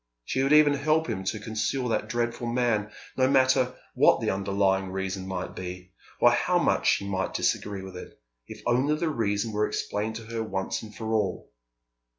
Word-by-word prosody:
She 130 - -1
would 135 +1 +1
even 150 -1 +7
help 155 +3 +1
him 95 - -3
to 110 +3 -2
conceal 110 +4 -2
that 115 - -1
dreadful 120 0 -2
man, 115 -3 +1 0.3
no 130 -1 +3
matter 130 -1 +3 0.2
what - - +5
the - - 0
underlying 95 0 +1
reason 95 0 -3
might 95 -1 -4
be, 90 0 -7 0.3
or - - +6
how - - +2
much - - +1
she 100 - -5
might 95 -1 -2
disagree 100 -2 -1
with 95 -1 -9
it, 90 - -10 0.3
if - - -10
only 130 +5 +2
the 160 +1 -1
reason 110 -5 -1
were 105 0 +1
explained 110 +2 -3
to 115 - -6
her 115 0 -4
once 95 -4 -3
and 110 -2 -11
for 110 +1 -3
all. 105 -4 -1
110 Hz, 185 wpm, -27 LUFS, 95-125 Hz, 0.3 s, even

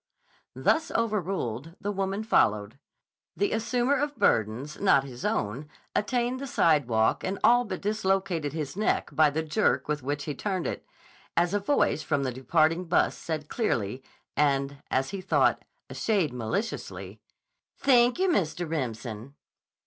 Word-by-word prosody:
Thus 320 - +2
overruled, 180 - -2
the 205 - -2
woman 195 +1 -2
followed. 105 - +2 0.6
The 405 - +1
assumer 245 +4 +1
of 290 -1 -2
burdens 115 +7 +1
not 140 -9 +4
his 130 -2 -9
own 125 +9 -2 0.3
attained 245 +3 0
the 275 - -5
sidewalk 130 - +2
and 190 +1 -2
all 245 +1 +5
but 190 -4 -5
dislocated 195 -6 0
his 150 -1 -4
neck 210 +2 0
by 155 -1 +5
the 160 +3 -2
jerk 160 +8 +1
with 150 -1 -1
which 145 +2 -3
he 150 - -3
turned 185 +3 -3
it, - - -4 0.5
as 175 +2 +2
a 205 - +2
voice 205 - +1
from 145 -2 0
the 130 -2 -2
departing 160 +7 +1
bus 170 - +2
said 155 -2 -4
clearly, 130 - -1 0.3
and, 140 -1 +1
as 135 +1 0
he 195 -2 -4
thought, - - +2 0.2
a - - -9
shade 195 - 0
maliciously: 125 - -4 0.6
"Thank 245 -3 +4
you, 380 +1 +2
Mr. 175 - 0
Remsen." 120 -4 -4
160 Hz, 150 wpm, -27 LUFS, 135-210 Hz, 0.6 s, all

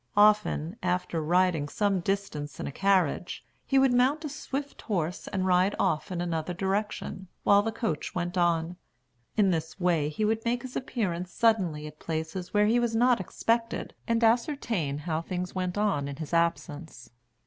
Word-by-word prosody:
Often, 210 -4 +3
after 180 -2 -1
riding 170 -2 +2
some 200 +1 +1
distance 170 -6 -3
in - - -3
a - - -4
carriage, 185 -1 +1 0.2
he 270 - +3
would 265 -2 +5
mount 270 +6 +2
a - - -3
swift 280 -1 -5
horse 180 -5 -2
and 190 -1 -1
ride 185 +2 +3
off 180 -2 0
in 175 -1 -2
another 170 0 -2
direction, 195 0 -2 0.2
while 200 0 +6
the 225 +2 -2
coach 220 -9 -3
went 175 0 -2
on. 170 -1 +1 0.6
In 200 -3 +4
this 160 +1 -3
way, 170 -5 +2
he 210 +8 -1
would 220 +1 0
make 240 +1 0
his 255 -1 -8
appearance 185 -9 -2
suddenly 185 -10 +1
at 150 0 -10
places 160 +3 -4
where 210 0 +4
he 230 +3 +3
was 235 -2 0
not 245 0 +4
expected, 230 +5 -1
and 230 0 +1
ascertain 225 - +1
how 155 +1 -2
things 180 +1 -4
went 185 0 -2
on 195 -10 +1
in 140 - -5
his 155 +2 -7
absence. 165 -5 -1
185 Hz, 170 wpm, -28 LUFS, 165-220 Hz, 0.6 s, while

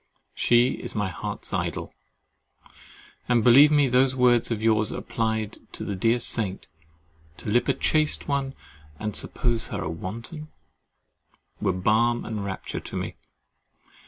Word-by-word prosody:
She 120 +1 +4
is - - -6
my 105 -3 0
heart's 90 - -6
idol; - - -3 1.4
and 120 -2 +3
believe 135 +6 +8
me 145 -2 +4
those 130 +1 +3
words 125 -2 +3
of 110 -2 -3
yours 110 -1 +3
applied 110 -2 -2
to - - -5
the 100 - -3
dear 115 +5 +2
saint—"To 80 -7 -6
lip 120 +4 +2
a - - +2
chaste 155 -1 +1
one 140 -1 -1 0.4
and 105 -2 -4
suppose 115 -2 0
her 100 -5 -4
wanton"—were 115 - -6 1.3
balm 110 +6 +1
and 110 -3 -4
rapture 95 -1 -5
to - - -9
me. - - -4
115 Hz, 130 wpm, -25 LUFS, 100-125 Hz, 1.4 s, believe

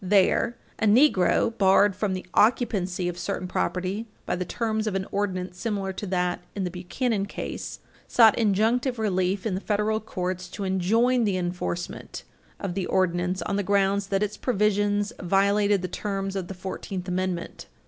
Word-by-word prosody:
There, 205 +5 +3 0.2
a - - +1
Negro, 225 -2 +4
barred 195 -1 +4
from 195 -1 -1
the 185 - -6
occupancy 200 -6 +2
of 175 0 -4
certain 185 0 -3
property 185 +4 -2 0.2
by - - -1
the 180 0 -3
terms 220 +1 -1
of 205 - -1
an 190 0 -1
ordinance 185 -3 -2
similar 200 -4 -2
to 205 - -5
that, 180 -1 0
in 200 - -2
the 180 - -2
Buchanan 195 +4 -2
case, - - -5 0.3
sought 225 -3 +6
injunctive 230 +4 +2
relief 190 -3 0
in 215 - 0
the 190 - -2
federal 210 +1 0
courts 185 -3 -4
to 205 - -6
enjoin 225 +7 +2
the 200 -4 +1
enforcement 175 -1 -4 0.4
of 195 -3 -3
the 190 0 -2
ordinance 180 -1 0
on 200 +3 -1
the - - +1
grounds 200 0 +1
that 195 +1 +1
its 210 0 -3
provisions 205 -1 +1
violated 200 +1 +2
the - - -1
terms 195 +1 -3
of 190 -2 -3
the 195 - -7
Fourteenth 185 0 -5
Amendment. 180 -1 -3
195 Hz, 170 wpm, -26 LUFS, 185-210 Hz, 0.4 s, sought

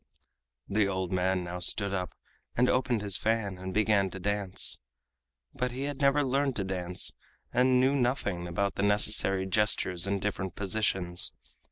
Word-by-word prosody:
The 100 0 +1
old 95 -2 -2
man 95 0 0
now 90 +1 -5
stood 100 +2 +1
up 90 -2 -3 0.4
and 125 +1 +4
opened 125 -4 +1
his 100 -1 +2
fan 105 -4 -1
and 95 0 -5
began 105 -1 +2
to 95 - -8
dance. 100 -1 -1 0.7
But 125 0 -2
he 130 +2 -5
had 145 -1 -4
never 140 +1 +4
learned 135 0 0
to 100 - -2
dance, 90 -1 -1 0.4
and 125 +1 +4
knew 130 +2 +3
nothing 120 -9 -1
about 100 +3 -1
the - - -3
necessary 100 -2 +3
gestures 95 -3 +1
and 100 0 0
different 95 -2 -3
positions. 95 -3 +1
100 Hz, 160 wpm, -29 LUFS, 95-120 Hz, 0.7 s, and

